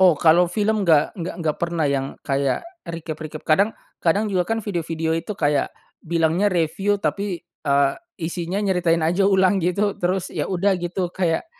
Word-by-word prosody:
Oh 180 -5 +6
kalau 170 +2 +5
film 210 +2 +1
enggak 155 -3 +4
enggak 180 -3 -5
enggak 160 -3 -1
pernah 170 -2 0
yang 140 -1 0 0.2
kayak 140 - 0 0.2
recap-recap. 155 -2 -7
Kadang 195 +7 +4 0.3
kadang 200 +6 +2
juga 190 -3 +1
kan 225 - +1
video-video 165 -6 -2
itu 165 +5 -3
kayak 145 0 +1 0.3
bilangnya 170 +4 +1
review 195 +4 0
tapi, 200 -3 -2
eee, 140 -5 0 0.3
isinya 170 +3 -3
nyeritain 180 -4 +2
aja 175 +5 +2
ulang 190 0 +4
gitu 200 +4 +1
terus 180 +1 -1
ya - - -1
udah 190 +2 +2
gitu 175 +1 -2
kayak, 170 - 0
175 Hz, 160 wpm, -22 LUFS, 160-195 Hz, 0.3 s, Oh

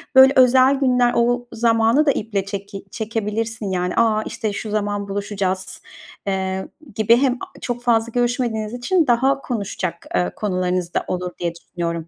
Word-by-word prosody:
böyle, 265 +1 +8
özel 260 +1 +6
günler 250 -3 +2
o 245 +1 +1
zamanı 230 +4 +3
da 285 - +5
iple 205 -6 -2
çeki 200 0 -7
çekebilirsin, 220 -1 -3
yani. 180 -1 -1
A, 220 -2 +2
işte, 215 -1 -4
şu 215 - -5
zaman 205 -1 -1
buluşacağız, 200 -2 -3 0.5
eee, 190 -1 -2 0.3
gibi 220 +2 +4
hem, 260 0 +2
aaa, 250 - -10
çok 245 0 -4
fazla 235 -1 +2
görüşmediğiniz 240 -3 -1
için 315 +7 +1
daha 265 +3 +2
konuşacak, 195 -8 -4
ııı, 90 0 +1
konularınız 180 -3 -1
da - - -1
olur 180 0 -3
diye 170 -1 -2
düşünüyorum. 170 -1 -5
220 Hz, 155 wpm, -21 LUFS, 195-245 Hz, 0.5 s, böyle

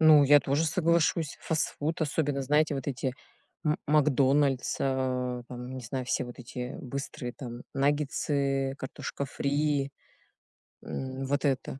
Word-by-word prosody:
Ну, 155 -2 +8
я 145 +1 +7
тоже 140 +4 +1
соглашусь. 165 -1 +2
Фастфуд, 160 0 -1
особенно, 145 -2 0
знаете, 150 +2 +3
вот 135 - -4
эти 130 -2 -2 0.5
"М 150 0 +2
макдональдс", 140 -2 +3
а 130 -2 0
там, 125 +1 -7
не 130 - -6
знаю, 130 +2 -3
все 130 - 0
вот 120 +1 -10
эти 125 +1 -6
быстрые 130 -2 -5
там 120 -1 -7
наггетсы, 140 -1 +1
картошка 130 +1 -4
фри, 140 0 0 0.9
м, 130 0 -4
вот 145 +2 0
это. 135 0 -1
140 Hz, 130 wpm, -29 LUFS, 130-150 Hz, 0.9 s, Ну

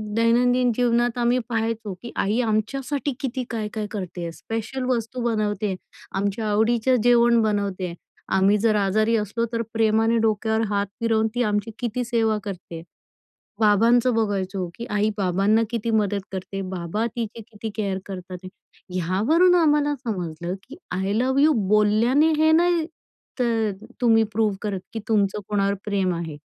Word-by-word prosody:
दैनंदिन 245 +2 +3
जीवनात 240 0 +1
आम्ही 240 +1 +2
पहायचो 225 -2 -2
की 235 - -8
आई 210 +5 0
आमच्यासाठी 260 +6 -1
किती 260 -1 -3
काय-काय 215 -1 -3
करती 185 -4 -5
आहे. 170 -1 -4
स्पेशल 225 +8 -5
वस्तू 245 0 -2
बनवती 215 -3 0
आहे, 195 -2 -1 0.4
आमच्या 200 +2 -1
आवडीचं 230 +4 +2
जेवण 235 -1 +5
बनवती 200 -3 -1
आहे. 170 -1 -6 0.4
आम्ही 195 +2 +4
जर 215 +1 +2
आजारी 215 +3 +2
असलो 225 +2 -1
तर, 230 - 0
प्रेमाने 225 +1 +2
डोक्यावर 220 +1 0
हात 200 -1 0
फिरवून 225 -1 +2
ती 245 - +2
आमची 210 0 -1
किती 245 0 -2
सेवा 225 -2 +1
करती 190 -4 -7
आहे. 165 - -7 0.8
बाबांचं 230 +3 +4
बघायचो, 195 -4 -1
की 235 - -6
आई 210 +1 +1
बाबांना 195 +3 +2
किती 230 -1 -2
मदत 205 -2 +1
करते. 195 +1 -5
बाबा 180 +6 -2
तिची 230 -1 -4
किती 215 +1 -6
केअर 200 -3 -1
करतात. 185 -1 -8 0.5
ह्यावरून 220 - +3
आम्हाला 295 -3 +3
समजलं 175 - -4
की 275 - -12 0.2
आय 190 +2 -1
लव्ह 260 +5 +2
यू 310 +1 +5 0.2
बोलल्याने 225 +9 +4
हे 315 0 +4
नाही 340 0 +3 0.5
तर 225 -3 +1 0.3
तुम्ही 225 -2 +5
प्रूव्ह 215 -2 +1
करत 200 -3 -2
की 225 - -3
तुमचं 210 -2 +1
कोणावर 200 -1 +1
प्रेम 195 -3 0
आहे. 165 -3 -5
220 Hz, 150 wpm, -23 LUFS, 200-240 Hz, 0.8 s, जेवण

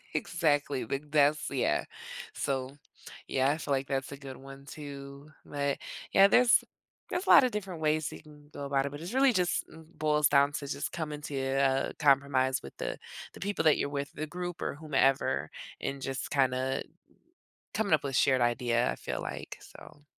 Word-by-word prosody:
Exactly, 145 -5 0
big 140 +4 -4
that's 150 0 +3
yeah. 135 -3 0 0.5
So, 135 +1 -3 0.5
yeah, 135 +1 +2
I 155 - -1
feel 145 - -5
like 135 0 -1
that's 135 0 -2
a 140 - -7
good 135 -2 -9
one, 135 +1 -12
too, 140 0 -9
but, 140 -1 -2 0.3
yeah, 195 0 +7
there's 245 +3 +5 0.5
there's 360 +2 -2
a - - 0
lot 275 - +9
of 250 - +2
different 190 -6 -5
ways 155 0 +1
that - - -9
you - - -17
can 150 -1 -17
go 140 - -6
about 140 0 +1
it, - - -2
but 145 +2 -8
it's 175 +8 -6
really 265 -1 +5
just 180 -2 +1
it 160 +1 -16
boils 150 -1 +3
down 140 0 +4
to 145 - -4
just 140 0 -3
coming 150 -2 -4
to 145 - -5
a 135 0 +1
compromise 135 -2 +3
with 70 - -9
the - - -3 0.4
the - - -12
people 200 -3 -1
that 155 -2 +5
you're - - -1
with, 140 0 -4
the 155 - -4
group 175 +1 -5
or - - -2
whomever, 135 - +1 0.3
and 135 0 -3
just 135 -1 -4
kinda 130 -1 +1 0.9
coming 210 -5 0
up 155 - +4
with 135 - -2
a - - -6
shared 130 -1 +4
idea, 120 0 +2
I - - -5
feel - - -4
like, - - -6
so 145 0 -15
140 Hz, 195 wpm, -30 LUFS, 135-155 Hz, 0.9 s, lot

